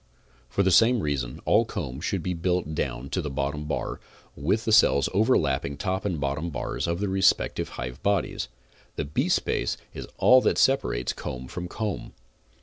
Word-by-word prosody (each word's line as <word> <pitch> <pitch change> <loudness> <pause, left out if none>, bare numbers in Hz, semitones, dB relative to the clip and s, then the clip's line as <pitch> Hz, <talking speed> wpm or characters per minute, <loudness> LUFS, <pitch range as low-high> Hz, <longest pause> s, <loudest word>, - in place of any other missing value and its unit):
For 100 - +1
the 95 - +3
same 115 +5 +5
reason 70 -6 -2
all - - +4
comb 65 +2 -5
should 90 0 -2
be 90 - -1
built 90 -2 -1
down 70 -3 -3
to 95 - 0
the 75 - -4
bottom 70 +2 -2
bar, 75 - -3 0.4
then 70 - -12
with 105 +7 +2
cells 70 -9 +5
overlapping 75 - +2
top 95 +3 -2
and 90 -6 -1
bottom 70 +4 -2
bars 75 - -3
of 85 +1 -1
the 100 - -1
respective 95 0 +2
hive 60 +1 -5
bodies, 100 0 0 0.5
the - - -2
beespace 70 -4 0 0.2
is - - -7
all 130 0 +6
that - - +1
separates 130 - +2
comb 65 0 -6
from 90 +6 -5
comb. 105 0 -4
85 Hz, 170 wpm, -26 LUFS, 70-95 Hz, 0.5 s, all